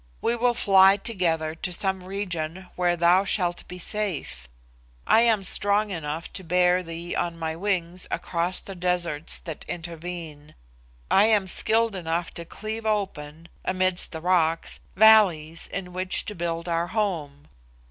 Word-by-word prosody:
We 235 - 0
will 240 0 +1
fly 195 -2 +6
together 170 -7 -1
to 165 +2 -5
some 190 +1 0
region 185 -2 -4
where 175 -1 +1
thou 175 +3 +4
shalt 180 -3 -1
be 180 - -8
safe. 180 - -3 0.6
I - - +5
am 225 -4 +3
strong 205 +2 +1
enough 160 -2 -5
to 190 - -6
bear 180 +1 +3
thee 170 0 -6
on 170 -1 -2
my 160 -1 -3
wings 180 -1 -2
across 175 +1 -2
the 195 - -8
deserts 175 -4 -1
that 160 -3 -7
intervene. 165 -3 -7 0.6
I 200 - +6
am 210 -3 +3
skilled 220 +3 +3
enough 170 -1 -2
to 170 - -7
cleave 220 +5 -6
open, 170 -7 -3 0.2
amidst 185 -1 0
the 160 -2 -6
rocks, 165 -2 +1 0.2
valleys 185 -7 +5
in 180 -2 -6
which 185 0 -1
to 210 - -4
build 170 -1 -3
our 170 0 0
home. 160 -10 -3
180 Hz, 145 wpm, -25 LUFS, 165-195 Hz, 0.6 s, fly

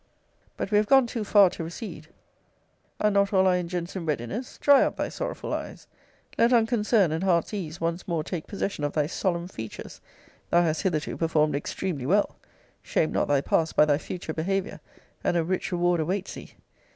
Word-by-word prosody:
But 195 - -4
we 205 - +4
have 210 0 +2
gone 270 +1 +6
too 230 -1 -4
far 200 -3 +5
to - - -6
recede. 165 -2 -7 0.9
Are 210 - +3
not 200 0 +2
all 190 -1 +4
our 185 - +4
engines 175 0 -3
in 185 - -3
readiness? 150 - -3
Dry 285 -1 +6
up - - -2
thy - - -2
sorrowful - - -4
eyes. - - -6 0.5
Let 235 +1 +5
unconcern 225 -5 +3
and 160 +3 -2
heart's 180 0 +1
ease 170 -6 -5
once 170 +2 -2
more 165 -4 -1
take 165 0 -5
possession 200 -5 -3
of 145 - -1
thy 150 -2 +1
solemn 175 +1 -2
features. 110 - -8 0.5
Thou 175 0 +4
hast 160 -2 0
hitherto 160 -6 -1
performed 155 -2 +1
extremely 145 -1 -3
well. 205 +5 +2 0.5
Shame 155 - 0
not - - 0
thy 145 -1 +2
past 160 +2 0
by 150 - +6
thy 145 -1 +2
future 160 +1 -6
behaviour; 195 +5 -2 0.4
and 175 - +1
a 170 - +2
rich 185 +3 -2
reward 175 -1 +1
awaits 185 +5 -2
thee. - - -11
175 Hz, 190 wpm, -26 LUFS, 160-200 Hz, 0.9 s, gone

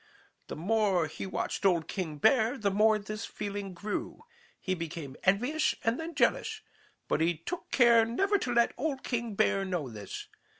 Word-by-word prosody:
The - - -6
more 195 0 +2
he 155 +5 -6
watched 190 - -3
old 175 -4 +3
King 165 -6 -4
Bear, 240 - +3
the 205 -4 0
more 215 +2 +4
this 215 +2 -6
feeling 200 -2 -5
grew. 205 +4 -4 0.4
He 185 - -1
became 165 -5 -6
envious 245 +11 +2
and 230 +5 +1
then 325 0 -5
jealous. 435 +8 +1 0.5
But - - 0
he 165 0 +2
took 340 - -6
care 235 -3 +6
never 390 - +1
to 250 - -2
let 235 -1 +3
old 275 -1 -2
King 235 -4 -2
Bear 195 0 +2
know 180 -8 -2
this. 105 -2 -7
210 Hz, 170 wpm, -30 LUFS, 180-240 Hz, 0.5 s, care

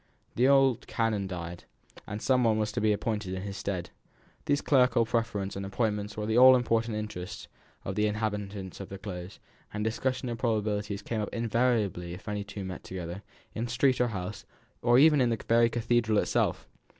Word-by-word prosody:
The 125 +3 +3
old 135 -3 +4
canon 110 -4 0
died, 85 -2 -6 0.4
and 105 0 -5
some 130 -1 +3
one 110 -2 +3
was 110 -1 0
to - - -2
be 110 0 +3
appointed 105 -3 -2
in 95 - -5
his 100 -1 -5
stead. 90 -2 -4 0.5
These 145 - +1
clerical 125 -4 +4
preferments 110 -4 -1
and 100 - -4
appointments 105 +1 -2
were 105 - -2
the 110 +2 +2
all 130 0 +9
important 115 -2 +1
interests 105 -4 -6 0.4
to 95 - -2
the 105 +2 +1
inhabitants 105 -3 -3
of 100 - -7
the 100 - -7
Close, 95 -2 -7 0.3
and 105 +1 -3
the - - +3
discussion 130 +2 -2
of 115 -1 -4
probabilities 105 -3 -1
came 110 0 -2
up 105 - -3
invariably 115 -7 0
if 100 +5 -14
any 105 -1 -2
two 100 -1 -7
met 95 -1 -6
together, 90 0 -6 0.3
in 115 +2 -3
street 130 +2 +2
or 125 - +3
house, 95 -2 -5 0.4
or 120 0 +4
even 150 0 +6
in 125 - +3
the 115 - 0
very 115 0 +5
cathedral 120 -2 +1
itself. - - 0
105 Hz, 190 wpm, -29 LUFS, 100-120 Hz, 0.5 s, all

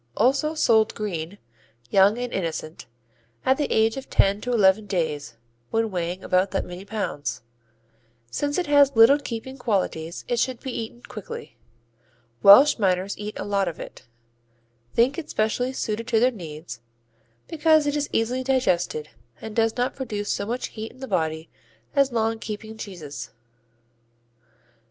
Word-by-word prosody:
Also 290 +5 +2
sold 220 -7 +3
"green," 190 -3 -4 0.5
young 200 +3 +5
and 245 0 -4
innocent, 165 -3 -4 0.6
at 265 +1 +4
the 295 - -1
age 220 +2 +2
of 270 - -7
ten 200 +1 +3
to 250 - -3
eleven 205 -2 +4
days 150 - -2 0.3
when 225 -1 0
weighing 180 +1 -3
about 185 +1 +2
that 195 - -2
many 180 +1 -8
pounds. 200 - -4 0.9
Since 290 - -1
it 365 - 0
has 285 -2 +5
little 230 +6 +7
keeping 260 0 -6
qualities 185 -7 -2
it 240 - 0
should 255 0 0
be 265 - -5
eaten 235 +1 -6
quickly. 200 - -8 0.9
Welsh 260 +8 +8
miners 190 -1 +1
eat 210 +1 -6
a - - -3
lot 200 -2 0
of 170 - -5
it, - - -10 0.9
think 255 +7 +3
it 315 - -8
specially 220 +4 0
suited 230 -3 -3
to 230 -1 +3
their 250 +3 +4
needs, 155 - -9 0.7
because 315 -1 +3
it 290 0 0
is 290 -1 -1
easily 245 +3 0
digested 185 - 0 0.3
and 220 -1 -8
does 225 0 +1
not 245 +1 0
produce 210 -6 -3
so 200 - -3
much 245 +3 -3
heat 220 0 -7
in 260 - -19
the 265 - -6
body 160 -3 -1 0.5
as 275 -1 +3
long 225 -1 0
keeping 220 +1 -6
cheeses. 155 - -8
220 Hz, 155 wpm, -24 LUFS, 185-255 Hz, 0.9 s, Welsh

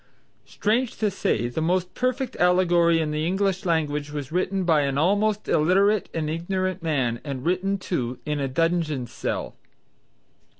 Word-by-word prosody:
Strange 225 +4 0
to 210 -2 0
say 120 - 0
the 120 +6 -3
most 180 +2 0
perfect 255 +1 -1
allegory 175 -2 +4
in 155 -2 -1
the 150 +1 -1
English 190 +2 0
language 150 -3 0
was 145 -1 -5
written 185 +2 0
by 160 -4 +3
an 140 -1 -1
almost 205 +6 +1
illiterate 195 +6 +3
and 160 -2 -2
ignorant 185 +3 -2
man, 130 -8 -1
and 135 -3 -5
written 190 +3 +1
too, 130 -10 -3
in 150 -1 -1
a 140 - -1
dungeon 160 -2 0
cell. - - -4
170 Hz, 155 wpm, -24 LUFS, 150-190 Hz, -, allegory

